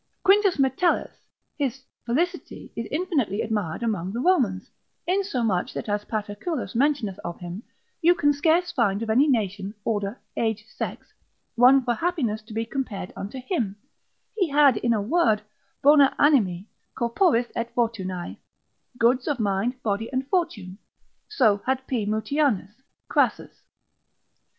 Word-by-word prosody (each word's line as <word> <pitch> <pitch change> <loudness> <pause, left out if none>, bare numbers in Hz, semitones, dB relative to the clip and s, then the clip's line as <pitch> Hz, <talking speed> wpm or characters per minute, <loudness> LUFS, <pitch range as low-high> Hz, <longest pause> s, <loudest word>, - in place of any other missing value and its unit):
Quintus 390 -2 +4
Metellus 275 +6 0 0.3
his 265 -2 -2 0.2
felicity 345 +9 -2
is 230 -1 -4
infinitely 290 - -1
admired 210 -3 -2
amongst 200 -3 -2
the - - -2
Romans, 245 - +1 0.3
insomuch 255 - 0
that - - -4
as 205 0 -1
Paterculus 215 - -4
mentioneth 255 -6 0
of 170 0 -5
him, 175 +3 -7 0.4
you 350 +1 +5
can 290 -2 +3
scarce 330 +5 +2
find 225 - +1
of 220 - -1
any 265 +7 +4
nation, 205 -5 -1
order, 205 -1 -2 0.2
age, 220 -2 -1
sex, - - -6 0.4
one 255 +3 +6
for 245 -1 +1
happiness 250 -8 -1
to 215 +2 -16
be 225 +1 -2
compared 225 -7 -4
unto 205 +7 -6
him: 250 - -2 0.6
he 380 -7 +1
had, 285 -4 +5
in 235 - 0
a 225 - +2
word, 220 -5 +2 0.4
Bona 285 -1 +6
animi, 205 - +3 0.3
corporis 240 0 +2
et 230 0 -2
fortunae, 190 -7 -2 0.6
goods 245 +2 +2
of 290 -4 -1
mind, 220 +5 -1
body, 215 +1 -1
and 260 0 -2
fortune, 220 - -2 0.5
so 220 - +3
had 265 0 0
P. 230 -6 -2
Mutianus, 220 -2 0 0.3
Crassus. - - 0
235 Hz, 135 wpm, -25 LUFS, 205-285 Hz, 0.6 s, one